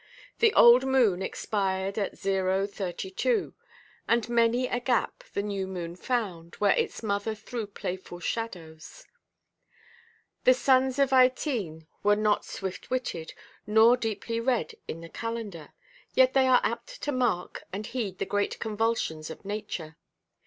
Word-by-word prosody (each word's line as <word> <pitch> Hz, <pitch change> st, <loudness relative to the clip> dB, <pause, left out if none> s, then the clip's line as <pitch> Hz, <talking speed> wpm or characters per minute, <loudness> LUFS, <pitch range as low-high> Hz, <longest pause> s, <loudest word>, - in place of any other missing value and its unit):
The 450 Hz, -1 st, +5 dB
old 240 Hz, +2 st, +8 dB
moon 245 Hz, -9 st, +3 dB
expired 195 Hz, -1 st, -2 dB
at 200 Hz, -, -2 dB
O·32; 195 Hz, -, -1 dB, 0.5 s
and 235 Hz, 0 st, +2 dB
many 235 Hz, +1 st, +3 dB
a 245 Hz, -, -1 dB
gap 245 Hz, -1 st, 0 dB
the 200 Hz, -, 0 dB
new 200 Hz, -2 st, -3 dB
moon 175 Hz, -2 st, -5 dB
found, 180 Hz, -6 st, -3 dB
where 205 Hz, -1 st, +3 dB
its -, -, -2 dB
mother 205 Hz, +1 st, -1 dB
threw 220 Hz, +1 st, -5 dB
playful 185 Hz, -3 st, -6 dB
shadows. 180 Hz, -, -6 dB, 1.4 s
The -, -, +6 dB
sons 260 Hz, -, +3 dB
of 275 Hz, -1 st, +3 dB
Ytene 250 Hz, -, +2 dB, 0.2 s
are 205 Hz, 0 st, +5 dB
not 210 Hz, 0 st, +1 dB
swift–witted, 190 Hz, -2 st, -4 dB, 0.3 s
nor 220 Hz, +3 st, +6 dB
deeply 230 Hz, -1 st, -3 dB
read 245 Hz, 0 st, 0 dB
in 165 Hz, -, -6 dB
the 165 Hz, -, -10 dB
calendar; 220 Hz, -9 st, -5 dB, 0.5 s
yet 260 Hz, 0 st, +5 dB
they 265 Hz, -1 st, +4 dB
are 255 Hz, -1 st, +5 dB
apt -, -, -4 dB
to 290 Hz, -, 0 dB
mark 245 Hz, -9 st, -1 dB
and 205 Hz, +3 st, -4 dB
heed 210 Hz, -7 st, -4 dB
the -, -, -2 dB
great 205 Hz, 0 st, -1 dB
convulsions 215 Hz, -8 st, -1 dB
of 160 Hz, -, -10 dB
nature. 200 Hz, -6 st, -5 dB
210 Hz, 135 wpm, -28 LUFS, 190-245 Hz, 1.4 s, old